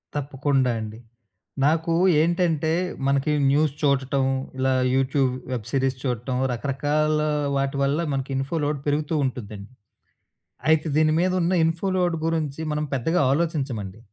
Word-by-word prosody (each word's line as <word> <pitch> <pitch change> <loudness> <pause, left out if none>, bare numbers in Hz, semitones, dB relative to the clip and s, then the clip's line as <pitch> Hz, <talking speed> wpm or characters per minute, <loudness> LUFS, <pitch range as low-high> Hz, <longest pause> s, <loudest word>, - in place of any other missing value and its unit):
తప్పకుండా 140 -2 0
అండి. 110 0 -7 0.7
నాకు 160 +2 +2 0.3
ఏంటంటే 165 -2 +1 0.4
మనకి 140 +2 +1 0.2
న్యూస్ 150 0 +2
చూడటం, 135 -2 +1 0.3
ఇలా 130 0 +1 0.2
యూట్యూబ్ 135 0 +2 0.2
వెబ్ 120 -5 -3
సిరీస్ 135 -1 0
చూడటం, 125 -1 -2 0.2
రకరకాల 145 +4 0 0.3
వాటి 135 0 -1
వల్ల 140 +3 +1
మనకి 135 0 -3
ఇన్‌ఫో 135 +5 -2
లోడ్ 145 0 -1
పెరుగుతూ 150 +2 0
ఉంటుందండి. 110 -4 -6 1.0
అయితే 160 0 +3
దీని 155 0 +3
మీదున్న 180 0 +1
ఇన్‌ఫో 165 +4 0
లోడ్ 175 -2 +1
గురించి 160 -3 -1
మనం 150 0 -1
పెద్దగా 155 +7 +1
ఆలోచించమండి. 135 - -2
140 Hz, 125 wpm, -24 LUFS, 130-160 Hz, 1.0 s, అయితే